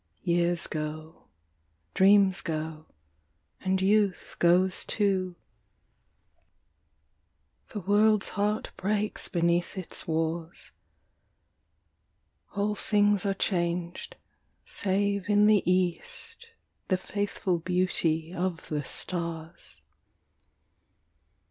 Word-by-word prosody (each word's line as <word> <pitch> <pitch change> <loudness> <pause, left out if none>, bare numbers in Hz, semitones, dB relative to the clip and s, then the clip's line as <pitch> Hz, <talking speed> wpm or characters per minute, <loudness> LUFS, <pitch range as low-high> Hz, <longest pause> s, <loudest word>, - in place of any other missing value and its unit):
Years 175 0 +1
go, 155 +1 -6 0.7
dreams 195 -1 +5
go, 155 -1 -4 0.7
and 190 0 0
youth 200 0 +1
goes 180 +2 +3
too, 190 -4 0 2.3
The 210 - -5
world's 210 +2 +3
heart 210 +1 -1
breaks 210 +2 -1
beneath 170 +1 0
its 185 - -5
wars, 165 +1 -3 1.8
All 205 +1 0
things 205 -1 +2
are 195 - 0
changed, 175 - -2 0.5
save 200 0 -1
in 205 0 +5
the 210 -2 +5
east 455 - -2 0.4
The 185 - +2
faithful 195 -2 -2
beauty 170 -2 0
of 180 -2 -3
the 150 -1 -2
stars. 165 - -4
185 Hz, 80 wpm, -28 LUFS, 170-205 Hz, 2.3 s, dreams